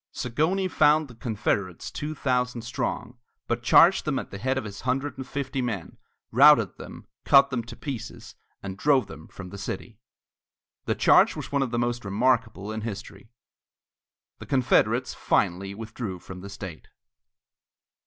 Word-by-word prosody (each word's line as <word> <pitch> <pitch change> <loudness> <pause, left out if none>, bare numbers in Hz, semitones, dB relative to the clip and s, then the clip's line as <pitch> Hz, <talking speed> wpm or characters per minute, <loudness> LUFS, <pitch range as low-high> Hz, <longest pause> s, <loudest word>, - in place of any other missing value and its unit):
Zagonyi 160 +10 0
found 155 -2 +3
the - - -11
Confederates 105 -5 -2
two 155 +1 -5
thousand 125 -3 -1
strong, 120 +1 -4 0.3
but 120 0 -2
charged 170 +10 +6
them 145 -3 -1
at - - -5
the 100 - -7
head 130 +4 0
of 130 - -2
his 100 -2 -8
hundred 130 +2 -1
and 130 0 -7
fifty 135 -1 -3
men, 110 -9 -4 0.3
routed 125 - +6
them, - - -10 0.2
cut 140 0 +6
them 125 -2 -1
to 120 0 -9
pieces, 135 -5 -7 0.3
and 95 0 -6
drove 130 +1 +3
them 80 -5 -11
from 90 -2 -10
the 100 +2 -9
city. 105 +3 -6 0.9
The - - 0
charge - - +5
was - - -7
one 140 -1 +1
of 135 - 0
the 120 - -2
most 120 0 -1
remarkable 110 -1 0
in 110 0 -4
history. 105 -1 -7 1.1
The - - -10
Confederates 130 -4 +2
finally 95 +3 0
withdrew 110 -3 -6
from 90 +1 -10
the 100 - -8
state. 95 -5 -9
120 Hz, 160 wpm, -26 LUFS, 100-135 Hz, 1.1 s, charged